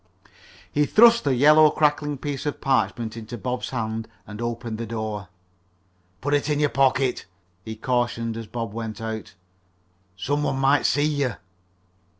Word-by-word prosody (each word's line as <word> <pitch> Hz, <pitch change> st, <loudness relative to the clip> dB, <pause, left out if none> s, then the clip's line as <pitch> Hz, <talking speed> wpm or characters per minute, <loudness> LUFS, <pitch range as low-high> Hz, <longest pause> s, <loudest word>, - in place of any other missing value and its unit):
He 145 Hz, 0 st, +2 dB
thrust 235 Hz, -2 st, +6 dB
the 135 Hz, -2 st, +2 dB
yellow, 150 Hz, +4 st, +7 dB
crackling 150 Hz, -1 st, +1 dB
piece 145 Hz, +1 st, -4 dB
of 145 Hz, -, -3 dB
parchment 120 Hz, -4 st, 0 dB
into 115 Hz, +1 st, -7 dB
Bob's 125 Hz, +3 st, -3 dB
hands 110 Hz, -2 st, -3 dB, 0.2 s
and 105 Hz, +1 st, -8 dB
opened 115 Hz, -1 st, -4 dB
the 115 Hz, -, -4 dB
door. 110 Hz, -3 st, -4 dB, 0.9 s
"Put 145 Hz, +2 st, -1 dB
it 145 Hz, +1 st, +1 dB
in 150 Hz, -1 st, +1 dB
your 150 Hz, -1 st, +3 dB
pocket," 135 Hz, -1 st, +1 dB, 0.4 s
he 110 Hz, +2 st, -6 dB
cautioned 120 Hz, -1 st, -1 dB
as 115 Hz, -1 st, -6 dB
Bob 115 Hz, -2 st, -5 dB
went 110 Hz, -2 st, -5 dB
out. 110 Hz, -4 st, -6 dB, 0.8 s
"Some 145 Hz, +10 st, -1 dB
one 135 Hz, -, -1 dB
might 135 Hz, +2 st, +3 dB
see 145 Hz, +1 st, +2 dB
you." 145 Hz, -6 st, 0 dB
125 Hz, 155 wpm, -24 LUFS, 115-145 Hz, 0.9 s, yellow